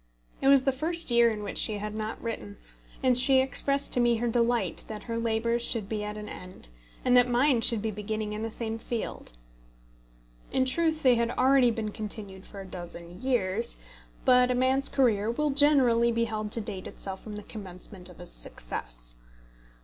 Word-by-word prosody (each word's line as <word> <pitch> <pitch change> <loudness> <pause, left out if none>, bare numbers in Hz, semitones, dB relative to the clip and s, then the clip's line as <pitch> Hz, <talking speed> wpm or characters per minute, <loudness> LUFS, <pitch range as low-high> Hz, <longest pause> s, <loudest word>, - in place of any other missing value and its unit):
It 270 - +1
was 275 -1 +6
the 270 - +2
first 320 +2 +1
year 235 0 +5
in 210 -2 -4
which 200 - -3
she 215 -2 +1
had 210 +1 -5
not 215 0 -5
written, 105 - -6 0.5
and 255 -1 +4
she 260 +2 +5
expressed 275 +2 +1
to - - +4
me 240 -1 +3
her 235 +2 -2
delight 235 -4 +1
that 215 -1 -7
her 230 -1 -4
labours 230 +1 0
should 230 -4 0
be 210 0 -3
at 210 0 -5
an 210 0 -7
end, 180 - -10 0.4
and 250 -1 +4
that 250 0 +5
mine 245 0 +3
should 230 -2 +6
be 220 - -1
beginning 210 +1 -4
in 210 - -5
the 225 - -3
same 225 0 -5
field. 230 - -6 1.2
In 260 - +1
truth 315 +3 0
they 250 -3 +5
had 235 0 0
already 260 -1 +4
been 220 -2 -3
continued 205 -3 -3
for 200 - -10
a - - -9
dozen 175 -1 -9
years, 235 -4 -1 0.5
but 250 0 +5
a 250 - +1
man's 260 +2 +2
career 225 -6 +1
will 295 +5 0
generally 265 -5 +4
be 230 0 0
held 215 -2 -4
to 230 - +1
date 200 -3 -3
itself 190 -1 -6
from 215 - -9
the 210 0 -7
commencement 185 -2 -8
of - - -14
his - - -9
success. - - -7
230 Hz, 195 wpm, -27 LUFS, 210-250 Hz, 1.2 s, was